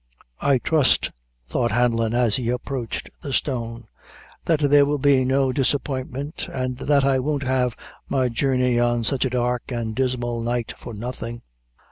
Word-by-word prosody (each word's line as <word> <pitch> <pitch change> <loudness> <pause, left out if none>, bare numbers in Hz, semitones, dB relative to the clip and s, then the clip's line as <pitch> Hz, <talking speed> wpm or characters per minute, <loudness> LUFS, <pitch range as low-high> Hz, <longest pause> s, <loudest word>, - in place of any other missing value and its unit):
"I 140 -1 +3
trust," 150 +2 +2 0.3
thought 120 - 0
Hanlon, 115 0 +1
as 120 -4 +3
he 120 -2 -2
approached 125 -1 -3
the 140 - -5
stone, 115 -4 -2 0.6
"that 160 -3 +2
there 145 0 +6
will 145 +1 +1
be 140 -1 +4
no 135 0 +2
disappointment, 135 +2 -2
and 130 -1 -2
that 140 0 +3
I 135 -1 +3
won't 140 +1 -1
have 130 -2 +1 0.3
my 130 -2 +2
journey 125 0 +1
on 120 -1 +2
sich 135 +4 0
a - - +1
dark 125 0 -1
and 115 -2 -2
dismal 120 -2 -1
night 120 0 -2
for 120 - -9
nothing. 120 +1 -6
125 Hz, 155 wpm, -23 LUFS, 120-135 Hz, 0.6 s, there